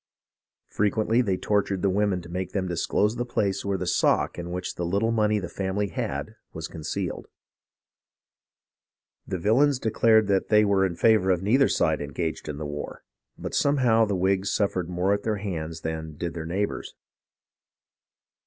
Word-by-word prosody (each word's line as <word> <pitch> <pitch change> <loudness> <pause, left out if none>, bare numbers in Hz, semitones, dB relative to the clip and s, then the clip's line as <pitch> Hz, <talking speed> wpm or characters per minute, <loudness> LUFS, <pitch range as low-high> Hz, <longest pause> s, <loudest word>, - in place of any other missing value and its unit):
Frequently 110 +3 +2
they 100 -6 0
tortured 100 -1 0
the 100 - +3
women 100 -2 0
to - - -11
make 90 +1 -4
them 95 -2 -1
disclose 100 +6 0
the 120 - 0
place 100 -5 -1
where 100 -1 -1
the 90 - -3
sock 85 - +1
in 85 0 -5
which 90 +1 -4
the 85 - -4
little 100 +6 +1
money 105 -2 +2
the 95 -3 -3
family 100 +1 -2
had 80 - -4 0.2
was 80 0 -5
concealed. 80 -2 -4 2.0
The 95 - -2
villains 125 +10 +3
declared 110 -1 +3
they 100 +2 +3
were 95 -1 +3
in 85 - -6
favour 110 -1 +3
of 90 -1 +2
neither 130 +7 +4
side 80 -3 +1
engaged 80 +2 -4
in 75 - -4
the 75 - -5
war; 75 0 -6 0.3
but - - -6
somehow 125 -6 +3
the 100 -2 -1
Whigs 95 +1 +1
suffered 95 -4 0
more 90 +2 +1
at 100 - -1
their 110 -1 -1
hands 85 -5 -5
than 80 -1 -5
did 85 0 -3
their 80 -1 -5
neighbours. 100 +4 -3
95 Hz, 165 wpm, -26 LUFS, 85-105 Hz, 2.0 s, neither